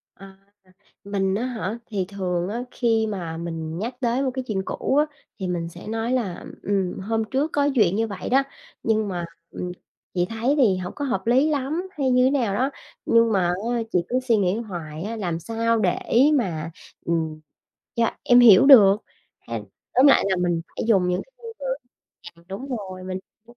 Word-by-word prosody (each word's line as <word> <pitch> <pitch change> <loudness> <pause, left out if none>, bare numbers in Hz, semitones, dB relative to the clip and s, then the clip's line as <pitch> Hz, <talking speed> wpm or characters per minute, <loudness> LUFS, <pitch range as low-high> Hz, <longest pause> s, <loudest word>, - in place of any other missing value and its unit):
À, 195 0 -14 0.7
mình 195 -1 0
á 230 +5 -1
hả? 225 -4 -3
Thì 200 -4 -2
thường 180 -3 -2
á 230 +4 -3
khi 225 -2 +1
mà 175 -6 -4
mình 165 -1 -5
nhắc 235 +5 -3
tới 245 +1 +1
một 265 - 0
cái 260 0 -3
chuyện 195 -3 -1
cũ - - -1
á, 295 +1 +4 0.3
thì 190 - -3
mình 170 -2 -2
sẽ 175 +1 -11
nói 225 +2 -2
là, 210 -9 -2 0.2
ừm, 195 -2 -1
hôm 225 +3 -1
trước 285 +4 0
có 285 -1 +2
chuyện 200 -6 +4
như 225 +2 +1
vậy 200 -3 -6
đó, 270 +2 +4 0.4
nhưng 220 -1 +1
mà, 175 -3 -3 0.3
ừm, 180 - -5 0.4
chị 175 -1 +1
thấy 230 +5 0
thì 215 -9 +4
hổng 180 0 -5
có 285 - -3
hợp 195 -6 -2
lý 260 +6 +4
lắm 305 +5 -1
hay 270 -3 +1
như 250 0 +4
thế - - +5
nào 245 -8 +1
đó, 260 +6 +1 0.4
nhưng 230 0 +4
mà 190 -4 +2
á 225 +7 -1
chị 180 - +3
cứ 255 - +1
suy 250 -3 +2
nghĩ 190 -2 +1
hoài 170 -8 -6
á, 220 +3 -4
làm 175 -6 -2
sao 230 +5 0
để 185 -4 +1 0.4
mà, 170 - -1 0.3
ừm, 160 -2 -1 0.6
cho 230 -1 +2
em 245 0 +6
hiểu 230 -1 +8
được 210 -8 +8 0.4
hay - - -5 0.3
tóm 260 +3 +6
lại 275 - +5
là 190 - +2
mình 175 -2 0
phải - - -5
dùng 195 -6 +4
những 180 - 0
cái - - -32
ngôn 465 -2 -9
từ 275 - -6 0.7
giằng, 170 - -21
đúng 200 +8 -6
rồi, 185 -3 -8
mình 185 0 -4 0.3
cũng 240 +1 -18
210 Hz, 205 wpm, -24 LUFS, 180-245 Hz, 0.7 s, hiểu